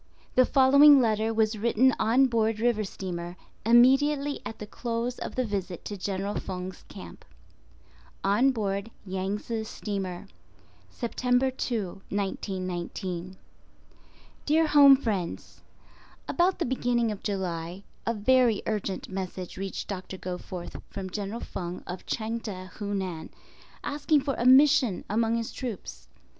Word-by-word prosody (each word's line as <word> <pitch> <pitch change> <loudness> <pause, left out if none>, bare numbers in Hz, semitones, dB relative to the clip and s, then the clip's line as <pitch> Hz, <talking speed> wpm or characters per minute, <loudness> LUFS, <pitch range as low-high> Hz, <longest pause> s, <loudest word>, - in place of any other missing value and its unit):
* - - -31
(The 255 0 +5
following 280 +2 +7
letter 220 -2 +1
was 220 -1 +1
written 235 +3 +3
on 240 +5 +4
board 225 -3 +1
river 230 -2 +2
steamer 175 -3 -5 0.3
immediately 275 +5 +4
at 220 - -7
the 210 - -7
close 235 +3 -3
of - - -6
the 255 - 0
visit 195 -4 -4
to 205 - -4
General 195 +1 -3
Feng's 185 0 -6
camp.) - - -11 1.0
On 210 +7 +4
Board 205 -4 -2 0.2
Yangtze 200 +4 -3
Steamer, 195 -4 -5 0.6
September 250 +2 0
2, 215 -7 -3
1919. 185 -2 -4 1.1
Dear 320 +2 +4
Home 285 -2 +8
Friends: 205 -9 -4 0.7
About 360 +2 +2
the - - -1
beginning 240 -2 0
of 205 - -6
July, 180 -2 -3 0.2
a 230 - +1
very 240 0 +3
urgent 205 -3 -3
message 185 -1 -5
reached 195 0 -5
Doctor 190 -1 -6
Goforth 180 -1 -6
from 190 -1 -6
General 205 +4 -4
Feng 175 0 -6
of 180 +1 -7
Chang 225 +1 -2
teh, 185 -4 -7
Hunan, 190 -5 -4 0.5
asking 290 0 +1
for 275 0 -1
a 240 - 0
"mission" 265 -5 +5
among 225 +1 +2
his 230 -1 -3
troops. 245 -7 -7
215 Hz, 130 wpm, -27 LUFS, 190-250 Hz, 1.1 s, Home